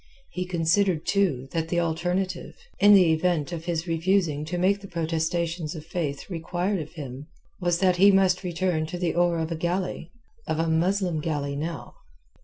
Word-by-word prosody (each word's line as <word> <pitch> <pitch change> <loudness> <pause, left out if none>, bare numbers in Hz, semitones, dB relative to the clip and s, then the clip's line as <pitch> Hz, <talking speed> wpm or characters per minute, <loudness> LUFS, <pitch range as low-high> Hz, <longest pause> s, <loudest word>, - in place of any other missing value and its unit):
He 180 0 -3
considered, 175 0 +1
too, 170 -11 +1
that 165 -1 -2
the 175 - +1
alternative—in 185 - +1
the 180 -4 +5
event 160 -2 0
of 165 -1 -5
his 170 -1 -2
refusing 165 -3 +1
to 175 +3 -3
make 195 +3 +2
the 195 - -9
protestations 165 -1 -2
of 155 -1 -8
Faith 155 -5 -3
required 180 +2 -2
of 155 +1 -7
him—was 155 +4 -5
that 185 -1 +2
he 200 +3 +7
must 190 -1 +3
return 175 -2 -1
to 175 - -5
the 175 -2 -1
oar 175 -1 +2
of 160 0 -2
a - - -1
galley, 175 0 -2 0.4
of 160 - -1
a 165 +1 0
Muslim 175 +1 +1
galley 145 -2 -2
now. 160 +2 -5
170 Hz, 170 wpm, -26 LUFS, 160-180 Hz, 0.4 s, he